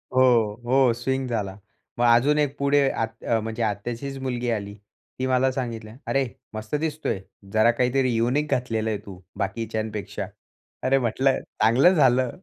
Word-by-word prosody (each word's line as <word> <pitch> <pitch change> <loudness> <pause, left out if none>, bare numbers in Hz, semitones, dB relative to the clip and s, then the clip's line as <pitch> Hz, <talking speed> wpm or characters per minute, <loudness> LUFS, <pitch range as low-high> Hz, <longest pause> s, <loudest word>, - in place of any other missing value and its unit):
हो, 120 -5 +4
हो 130 -1 +4
स्विंग 130 +2 -2
झाला. 100 -4 -3 0.4
मग 120 - +3
अजून 145 +5 +3
एक 145 -1 0
पुढे 140 0 +3
आत 115 0 -4
अ, 115 -1 +1
म्हणजे 110 +1 -3
आत्याचीच 120 +6 -3
मुलगी 125 -2 -2
आली. 100 -3 -2 0.5
ती 130 - 0
मला 130 +1 +2
सांगितल्या, 115 -4 -5
"अरे, 135 -1 +1 0.3
मस्त 110 +5 -4
दिसतोय 155 -9 -2 0.3
जरा 110 +2 +5
काहीतरी 125 +2 +1
युनिक 130 +6 +1
घातलेलं 110 -3 0
आहे 110 - -1
तू 95 -3 -10 0.2
बाकीच्यांपेक्षा." 110 0 -3 0.6
अरे 135 - +3
म्हटलं, 130 +2 +1 0.2
चांगलं 125 - +5
झालं, 130 -4 +4
120 Hz, 150 wpm, -24 LUFS, 110-135 Hz, 0.6 s, जरा